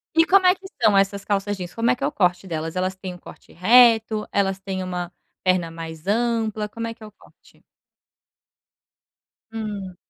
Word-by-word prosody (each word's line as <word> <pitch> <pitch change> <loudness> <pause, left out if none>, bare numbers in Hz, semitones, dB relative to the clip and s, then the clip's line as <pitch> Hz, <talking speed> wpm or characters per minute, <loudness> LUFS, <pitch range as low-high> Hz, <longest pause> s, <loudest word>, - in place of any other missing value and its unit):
E 325 - +6
como 380 0 +5
é 365 - +5
que 380 0 -18 0.2
são 205 -2 +5
essas 195 0 +1
calças 205 0 -1
jeans? 180 -2 -7
Como 230 +1 0
é - - +2
que 275 - -8
é - - +2
o - - -3
corte 185 - 0
delas? 160 -1 -4
Elas 185 +1 -1
têm 185 -1 -7
um - - -11
corte - - -15
reto, 225 +2 +4
elas 195 -1 0
têm 190 -1 -4
uma 180 -1 -4 0.3
perna 185 -2 +1
mais 165 +1 -9
ampla, 220 -1 0
como 230 +2 -6
é 230 - -5
que 225 - -17
é - - -8
o - - -14
corte? - - -23 1.9
Hum. 205 -4 -5
200 Hz, 195 wpm, -23 LUFS, 185-225 Hz, 1.9 s, E